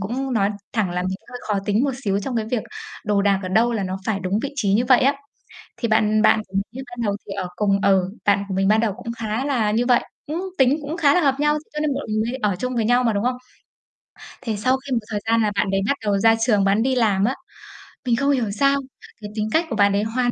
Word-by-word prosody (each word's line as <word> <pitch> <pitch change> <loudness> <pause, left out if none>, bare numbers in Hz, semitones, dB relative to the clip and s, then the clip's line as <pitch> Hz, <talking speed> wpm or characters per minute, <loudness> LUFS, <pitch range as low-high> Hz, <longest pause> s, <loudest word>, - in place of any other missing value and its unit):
cũng 255 +7 -3
nói 205 -3 +2 0.2
thẳng 215 -6 0
là 180 +1 -2
mình 185 +1 -2
hơi 245 - -7
khó 205 -2 +1
tính 210 +5 +1
một 280 - +1
xíu 195 -1 +1
trong 245 +3 -3
cái 220 -1 -1
việc 240 -4 0 0.4
đồ 205 -1 +1
đạc 200 -1 +2
ở 185 - -4
đâu 225 +5 +3
là 220 -3 -1
nó 185 0 -3
phải 210 -3 0
đúng 190 +2 -1
vị 280 - -4
trí 205 -8 +1
như 235 +4 +2
vậy 250 0 +5
á. 275 +2 +3 0.6
Thì 235 - -1
bạn 215 -1 +3
bạn 220 - +4
của 190 - -4 0.2
mình 265 +2 -6
ban 245 -1 -7
đầu 200 -1 0
thì 200 - -5
ở 190 -2 -3
cùng 200 0 +1
ừ, 190 -2 +3 0.2
bạn 200 -1 +3
của 195 - -4
mình 195 0 +1
ban 215 +2 +4
đầu 220 -3 0
cũng 230 - -7
khá 220 +3 -2
là 240 -7 +1
như 230 +3 +1
vậy, 245 -1 +3 0.2
cũng 315 +4 -3 0.2
tính 265 +2 +4
cũng 300 +3 -5
khá 290 -4 +4
là - - +4
hợp 275 -4 +3
nhau, 295 +1 +2 0.2
cho 300 - -3
nên 300 -2 0
bọn 275 - -4
mình 215 0 0
mới 235 +3 -2 0.2
ở - - -2
chung 255 +2 -3
với 230 -2 +1
nhau 245 +2 +3
mà, 230 -2 +2
đúng 200 0 -1
không? 250 +1 0 1.1
Thì 225 -4 -2
sau 255 +6 +2
khi 265 +1 -8
một 245 - +3
thời 210 -1 -2
gian 230 0 +3
là 210 -1 +1
bạn 195 - +1
đấy 195 0 +1
bắt 280 - +1
đầu 205 -2 +1
ra 225 +3 +5
trường 215 -4 +3
bạn 200 +3 +2
đi 260 +2 +1
làm 210 -6 +2
á, 250 +5 +1 0.7
mình 240 -2 +2
không 280 +4 +1
hiểu 245 -7 0
sao 275 +7 +2 0.4
cái 210 - -6
tính 215 0 -1
cách 330 +2 +3
của 230 - -2
bạn 200 -1 +4
đấy 200 +1 +1
hoàn 245 +3 0
220 Hz, 280 wpm, -22 LUFS, 200-255 Hz, 1.1 s, vậy